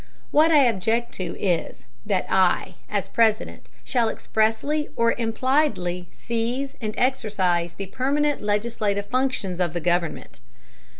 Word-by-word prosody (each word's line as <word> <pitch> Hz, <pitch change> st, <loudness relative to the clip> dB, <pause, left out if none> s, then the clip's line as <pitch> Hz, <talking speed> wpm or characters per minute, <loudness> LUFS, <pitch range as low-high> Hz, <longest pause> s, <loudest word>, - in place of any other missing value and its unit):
What 310 Hz, +2 st, +5 dB
I 300 Hz, -3 st, +6 dB
object 230 Hz, +1 st, +1 dB
to 185 Hz, -, -5 dB
is, 175 Hz, -4 st, -1 dB, 0.2 s
that -, -, +1 dB
I, -, -, +2 dB, 0.2 s
as -, -, -1 dB
President, 220 Hz, -1 st, +1 dB, 0.2 s
shall 240 Hz, -3 st, +1 dB
expressly 225 Hz, +10 st, 0 dB
or 230 Hz, 0 st, +3 dB
impliedly 225 Hz, -, 0 dB
seize 240 Hz, +4 st, -3 dB
and 215 Hz, -2 st, -3 dB
exercize 190 Hz, -9 st, 0 dB
the 195 Hz, -, -5 dB
permanent 285 Hz, +8 st, 0 dB
legislative 205 Hz, -1 st, -1 dB
functions 255 Hz, -6 st, -1 dB
of 175 Hz, -3 st, 0 dB
the 175 Hz, -, -1 dB
government. 175 Hz, 0 st, -1 dB
225 Hz, 125 wpm, -24 LUFS, 190-260 Hz, 0.2 s, I